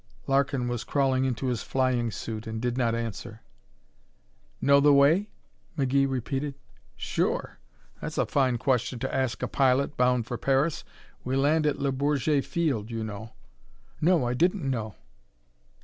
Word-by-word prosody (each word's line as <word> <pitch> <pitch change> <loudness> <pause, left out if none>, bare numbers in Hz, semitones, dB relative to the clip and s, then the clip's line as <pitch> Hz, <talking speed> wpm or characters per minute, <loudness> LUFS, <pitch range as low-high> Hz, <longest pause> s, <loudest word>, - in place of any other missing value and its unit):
Larkin 135 -2 +1
was 120 -1 -3
crawling 135 -2 +1
into 130 0 -2
his 125 -3 -1
flying 130 -3 0
suit 110 +2 -6
and 110 0 -4
did 120 +1 -1
not 120 -3 +1
answer. 115 0 -5 1.2
"Know 140 +1 +5
the 145 +1 +5
way?" 150 +9 +4 0.5
McGee 135 0 +2
repeated. 135 +2 -3 0.4
"Sure. - - -2 0.4
That's - - -5
a - - +2
fine 130 -3 +1
question 125 0 0
to 130 +3 -3
ask 130 -3 -1
a - - 0
pilot 135 +1 +2
bound 125 -2 +2
for 120 0 -5
Paris. 135 +4 +1 0.4
We 130 +1 -2
land 150 +3 +2
at 145 - 0
Le 140 0 0
Bourget 140 +1 +1
field, 135 -11 -1
you 115 -1 -3
know." 110 +1 -7 0.7
"No, 165 -4 +3
I 120 - 0
didn't 175 +3 +1
know." 110 -6 -3
130 Hz, 150 wpm, -27 LUFS, 120-140 Hz, 1.2 s, Know